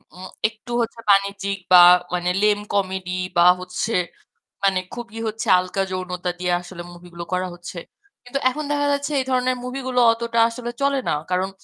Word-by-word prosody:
উম 185 +1 -9 0.2
একটু 220 +3 -12
হচ্ছে 230 0 -4
বাণিজ্যিক 200 0 +2
বা 180 - +10 0.4
মানে 180 0 0
lame 210 -1 +3
comedy 190 -2 -1 0.3
বা 170 - +6 0.2
হচ্ছে 180 +5 -3 0.7
মানে 190 -1 +3
খুবই 230 -2 -8
হচ্ছে 220 +1 -4
হালকা 185 +2 -2
যৌনতা 180 -1 -3
দিয়ে 180 -1 -1
আসলে 175 0 -10
মুভি 175 0 -14
গুলো 170 0 -6
করা 185 0 0
হচ্ছে। 175 0 -9 0.5
কিন্তু 245 +3 -3
এখন 300 +4 -5
দেখা 290 0 +1
যাচ্ছে 285 +1 -2
এই 260 - -2
ধরনের 255 0 +1
মুভি 250 +2 -5
গুলো 250 -1 +1
অতটা 230 0 -1
আসলে 240 +1 -6
চলে 280 0 +2
না। - - +1 0.2
কারণ 185 +1 0
200 Hz, 175 wpm, -22 LUFS, 180-240 Hz, 0.7 s, বা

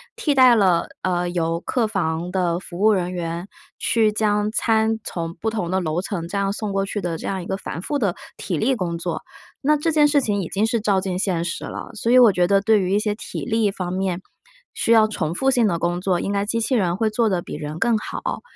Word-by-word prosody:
替 315 -11 0
代 255 -3 +7
了， 185 -5 +3
呃， 175 -1 0
由 165 -1 -1
客 240 +3 0
房 175 -4 -2
的 175 -2 0
服 175 -1 -9
务 215 +1 +5
人 180 -2 -1
员 170 +1 -4 0.3
去 225 -2 +2
将 210 -1 +1
餐， 220 -1 +2
从 165 -1 -5
不 220 +6 -2
同 210 -6 -3
的 190 0 0
楼 160 +1 -1
层 185 -4 -4
这 200 - -3
样 200 0 0
送 210 -1 -4
过 195 0 0
去 205 +1 -4
的 170 -2 -2
这 - - -6
样 190 -2 -2
一 - - -9
个 190 - -2
繁 175 - -6
复 290 +8 -2
的 200 -6 0 0.2
体 175 -5 -3
力 260 - +2
工 170 -5 -2
作， 170 0 -3 0.4
那 300 +2 +3
这 325 +2 0
件 300 -1 +5
事 285 -1 +3
情 205 -4 0
已 170 - -4
经 205 +3 0
是 230 0 0
照 200 -3 +1
进 185 -2 -3
现 180 -4 0
实 170 - -4
了。 - - -7
所 230 - -2
以 255 - +7
我 240 -4 +8
觉 180 -1 +2
得 195 0 +3
对 215 +1 +4
于 185 +1 -1
一 - - +3
些 210 -1 0
体 - - -6
力 220 -2 +1
方 180 -2 -4
面， 185 -1 -1 0.5
需 230 - 0
要 220 -1 +6
重 170 -7 -2
复 270 +4 +2
性 240 -4 +3
的 170 -3 0
工 175 +1 0
作， 185 -2 +1
应 200 - -2
该 200 0 0
机 230 +2 -1
器 260 - 0
人 180 -5 +1
会 220 +2 +1
做 225 +1 +1
得 180 -3 0
比 - - -7
人 150 +1 -5
更 235 -2 +3
好。 - - -4
195 Hz, 270 characters per minute, -22 LUFS, 175-220 Hz, 0.5 s, 我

